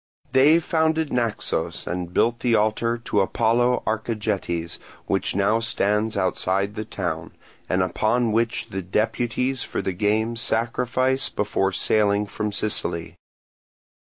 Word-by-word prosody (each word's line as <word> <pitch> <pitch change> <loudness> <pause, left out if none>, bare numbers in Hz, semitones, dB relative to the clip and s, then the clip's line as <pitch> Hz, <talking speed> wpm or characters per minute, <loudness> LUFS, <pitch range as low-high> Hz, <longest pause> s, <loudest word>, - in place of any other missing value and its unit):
They 140 +5 +6
founded 160 -2 0
Naxos 115 -3 -1
and 90 -1 -4
built 120 +5 +2
the 120 -2 +2
altar 110 +2 +1
to 115 -3 0
Apollo 120 +5 +2
Archegetes, 105 -6 -2 0.3
which - - -1
now 100 +3 +2
stands 105 -1 0
outside 100 +1 0
the 110 0 -5
town, - - -4 0.4
and 90 0 +2
upon 110 +6 +1
which 115 +1 0
the 95 - -3
deputies 115 +6 0
for - - -4
the 95 - -2
games 110 +4 0
sacrifice 125 +3 0
before 95 -2 0
sailing 105 +1 +2
from 105 +1 -3
Sicily. 90 -5 -2
110 Hz, 125 wpm, -23 LUFS, 100-120 Hz, 0.4 s, They